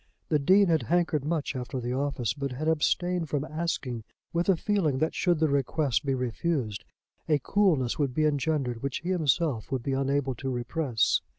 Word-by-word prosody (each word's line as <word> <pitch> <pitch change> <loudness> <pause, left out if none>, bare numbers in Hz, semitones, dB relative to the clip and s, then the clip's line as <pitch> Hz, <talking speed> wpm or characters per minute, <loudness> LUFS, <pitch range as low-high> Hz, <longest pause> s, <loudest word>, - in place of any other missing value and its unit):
The 150 - +3
Dean 190 +8 +5
had 165 -4 +2
hankered 170 -4 +1
much 150 -2 -2
after 130 +1 -4
the 120 0 -3
office, 135 -3 -1
but 140 -2 -4
had 150 +5 -3
abstained 165 +1 +1
from 145 0 -1
asking 155 -8 -3 0.3
with 170 +3 0
a 190 - +5
feeling 180 -9 +1
that 155 +4 0
should 175 -2 +2
the 160 +1 +2
request 140 -1 +1
be 135 -2 0
refused 125 -3 -2 0.5
a 150 - +5
coolness 150 - +1
would 135 -4 0
be 155 - +2
engendered 145 -5 0
which 140 -1 -3
he 175 - -4
himself 155 - +1
would 130 -3 -1
be 135 - -1
unable 135 0 0
to 135 +2 -5
repress. 125 -1 +1
145 Hz, 185 wpm, -28 LUFS, 130-165 Hz, 0.5 s, Dean